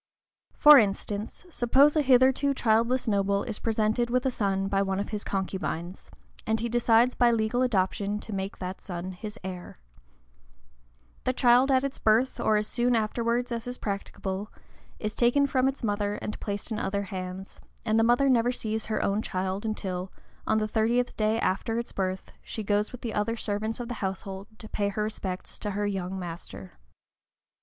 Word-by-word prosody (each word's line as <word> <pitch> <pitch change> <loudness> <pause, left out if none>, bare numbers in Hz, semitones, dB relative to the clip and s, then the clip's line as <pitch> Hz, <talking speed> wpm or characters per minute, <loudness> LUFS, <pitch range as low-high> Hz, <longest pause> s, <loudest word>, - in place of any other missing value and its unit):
For 295 -2 +9
instance, 205 - -2
suppose 275 +3 +4
a 305 - +4
hitherto 265 +1 +4
childless 235 +2 +2
noble 200 -1 +1
is 225 -4 -4
presented 225 +1 0
with 250 +1 +1
a 265 - +2
son 195 -4 0
by 195 0 +1
one 195 -1 -1
of 200 - -3
his 210 -2 -4
concubines, 190 -2 -4 0.4
and 220 0 +1
he 235 - -1
decides 240 +1 +4
by 240 - +4
legal 230 +1 +1
adoption 205 -3 0
to 220 - -7
make 195 0 -4
that 185 0 -6
son 180 0 -5
his 210 +4 -8
heir: 185 - -7 1.5
the 255 - +1
child 250 +1 +4
at 260 -1 +3
its 275 -1 -3
birth, 225 +4 +2
or 215 - +3
as 210 - 0
soon 240 +2 +1
afterwards 235 +2 0
as 230 0 -4
is 250 0 -3
practicable, 200 0 -4 0.5
is 215 0 -3
taken 250 +4 +3
from 265 -1 +2
its 270 -1 -3
mother 205 -1 0
and 210 - -5
placed 205 +2 -4
in 220 - -1
other 200 +1 -1
hands, 190 -1 -7 0.3
and 220 0 +2
the - - +4
mother 245 +4 +4
never 245 -2 +3
sees 220 -3 -3
her 220 - -1
own 200 +2 +1
child 190 +2 -3
until, 185 -4 -3 0.4
on 220 - +3
the 215 0 0
thirtieth 235 +3 +1
day 215 +1 +1
after 225 +4 0
its 235 - -3
birth, 190 -1 -3
she 220 - -6
goes 205 +1 +1
with 250 - -10
the 230 - -4
other 230 +3 -1
servants 215 +2 -2
of 240 - -4
the 245 - -4
household 195 0 -4
to 220 - -10
pay 205 -1 -1
her 210 +1 -2
respects 190 -3 -4
to 210 - -3
her 205 +1 -1
young 190 -2 -3
master. 170 - -8
215 Hz, 180 wpm, -27 LUFS, 195-240 Hz, 1.5 s, For